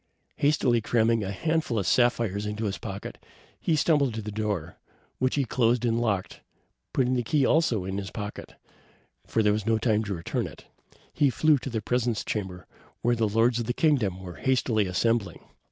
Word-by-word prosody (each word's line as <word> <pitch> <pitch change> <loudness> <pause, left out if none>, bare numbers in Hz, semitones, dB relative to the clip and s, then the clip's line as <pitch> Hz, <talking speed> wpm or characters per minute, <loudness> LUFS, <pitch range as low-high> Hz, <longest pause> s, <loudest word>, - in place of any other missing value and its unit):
Hastily 140 -5 +2
cramming 115 0 +2
a 95 - -3
handful 155 - -1
of 100 - 0
sapphires 115 -3 +2
into 105 +1 -3
his 100 -1 -3
pocket, 100 -3 -7 0.4
he 165 - +1
stumbled 145 -6 +2
to 110 - -4
the 105 - -5
door, 100 -6 -3 0.4
which 130 0 +1
he 140 -2 +1
closed 120 0 +1
and 115 0 +1
locked, 100 -5 -2 0.5
putting 130 -1 +1
the 125 - +1
key 135 +4 +1
also 125 - +2
in 95 +1 -3
his 100 -1 -5
pocket, 105 -1 -7 0.7
as 110 - +1
there 105 0 +4
was 105 0 -3
no 115 0 +3
time 110 -1 +1
to 100 -1 -3
return 85 - -2
it. - - -13 0.5
He 145 -2 +3
flew 150 +2 +3
to 130 - -6
the 110 -4 -3
presence 120 -1 0
chamber, 95 -4 -4 0.4
where 120 0 +3
the 110 -2 +1
lords 115 +3 +2
of 115 - -3
the 120 - 0
kingdom 115 - +1
were 90 -2 -8
hastily 120 -5 +1
assembling. 100 0 0
115 Hz, 185 wpm, -27 LUFS, 105-125 Hz, 0.7 s, there